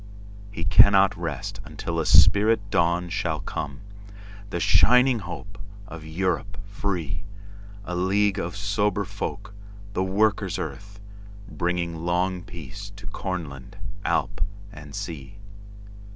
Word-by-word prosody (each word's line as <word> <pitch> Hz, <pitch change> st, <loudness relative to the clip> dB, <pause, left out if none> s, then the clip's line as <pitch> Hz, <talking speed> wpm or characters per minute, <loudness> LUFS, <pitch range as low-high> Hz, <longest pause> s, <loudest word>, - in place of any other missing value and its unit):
He 85 Hz, -5 st, -5 dB
cannot 95 Hz, +3 st, +6 dB
rest 80 Hz, -6 st, -4 dB
until 85 Hz, 0 st, -4 dB
a 80 Hz, -, 0 dB
spirit 100 Hz, +2 st, +5 dB
dawnShall 85 Hz, +1 st, 0 dB
come;—the 100 Hz, -1 st, -7 dB
shining 125 Hz, +6 st, +5 dB
hope 100 Hz, +2 st, -8 dB, 0.3 s
of 85 Hz, -5 st, -9 dB
Europe 95 Hz, +5 st, -2 dB
free:A 100 Hz, +1 st, -5 dB
league 100 Hz, +2 st, +2 dB
of 85 Hz, +2 st, -4 dB
sober 100 Hz, 0 st, 0 dB
folk, 100 Hz, +1 st, -5 dB, 0.4 s
the 95 Hz, -, +1 dB
Workers' 105 Hz, +3 st, +1 dB
Earth, 100 Hz, 0 st, -6 dB, 0.5 s
Bringing 85 Hz, -3 st, -2 dB
long 90 Hz, +2 st, 0 dB
peace 95 Hz, +5 st, -9 dB
to 100 Hz, 0 st, -12 dB
Cornland, 85 Hz, -9 st, -5 dB, 0.3 s
Alp -, -, 0 dB, 0.3 s
and 75 Hz, -1 st, -10 dB
Sea. 85 Hz, -3 st, -6 dB
100 Hz, 105 wpm, -25 LUFS, 85-100 Hz, 0.5 s, cannot